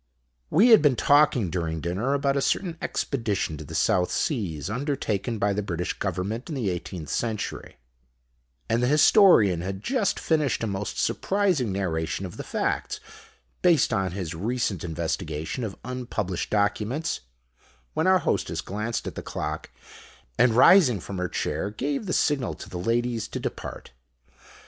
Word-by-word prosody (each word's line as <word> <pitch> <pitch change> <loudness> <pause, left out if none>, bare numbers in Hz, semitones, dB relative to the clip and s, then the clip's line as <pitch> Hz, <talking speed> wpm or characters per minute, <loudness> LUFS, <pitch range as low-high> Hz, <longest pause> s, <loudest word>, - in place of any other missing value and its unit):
We 210 +10 +5
had 225 -3 +8
been 145 -4 +4
talking 140 - +3
during 80 -3 -2
dinner 95 - -1
about 140 -1 +1
a 140 - +1
certain 175 +3 0
Expedition 105 - -1
to 75 - -7
the 70 - -8
South 90 -1 +2
Seas 90 - -1
undertaken 120 -2 -2
by 100 -1 +1
the 105 - -1
British 90 -3 -3
Government 100 - -3
in 155 - -3
the 115 -8 -1
eighteenth 85 -3 -6
century; 110 -3 -3 0.9
and 115 +1 +1
the 125 - +2
Historian 150 - +6
had 95 +2 -5
just 250 -7 0
finished 150 -8 +1
a - - +1
most 100 -1 -3
surprising 185 - +1
narration 90 -1 -2
of 90 - -8
the - - -5
facts, - - -2 0.6
based 170 -6 +4
on 95 -2 0
his 90 -4 -4
recent 105 0 -2
investigation 80 - -3
of 105 -4 -5
unpublished 120 -8 -3
documents, 110 - 0 0.7
when - - +1
our 185 0 +6
Hostess - - -1
glanced 105 +4 -3
at - - -4
the - - -6
clock, - - -5 0.7
and 120 -3 +4
rising 130 - +6
from 95 +2 -6
her 90 -1 -1
chair 80 +7 -2
gave 140 - -3
the - - -2
signal 135 - +1
to 75 - -10
the 90 - -5
ladies 115 +2 0
to - - -5
depart. - - -6
110 Hz, 155 wpm, -26 LUFS, 90-140 Hz, 0.9 s, had